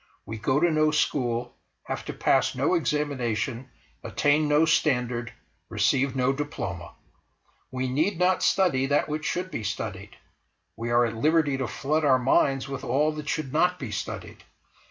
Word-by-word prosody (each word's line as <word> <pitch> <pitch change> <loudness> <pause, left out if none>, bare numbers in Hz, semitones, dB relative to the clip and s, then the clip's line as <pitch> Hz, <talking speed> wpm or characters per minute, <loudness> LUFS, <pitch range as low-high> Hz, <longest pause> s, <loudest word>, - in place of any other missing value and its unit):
We 110 +1 -6
go 130 +7 +1
to 175 +1 +3
no 155 0 +3
school, 120 -5 -1 0.3
have - - -5
to - - -5
pass - - +2
no 135 +7 +1
examination, 135 -6 -1 0.3
attain 150 +1 +1
no 150 +2 +4
standard, 125 -6 +1 0.4
receive 130 +6 +1
no 130 +1 +2
diploma. 145 +1 -5 0.7
We 130 0 -3
need 160 +9 0
not 180 +1 +2
study 135 -9 +2
that 145 +1 +1
which 155 +1 -4
should 185 +1 -2
be 110 - -4
studied; 105 - -5 0.6
we 115 +1 -4
are 120 0 +4
at 115 -1 -3
liberty 150 +3 +2
to 135 -2 -2
flood 155 +7 -1
our 135 -3 +5
minds 135 +1 +2
with 135 -1 -6
all 145 +5 +1
that 150 -1 -6
should 145 -4 -3
not 180 +3 +2
be 130 -9 -6
studied. 95 - -6
135 Hz, 160 wpm, -26 LUFS, 125-155 Hz, 0.7 s, our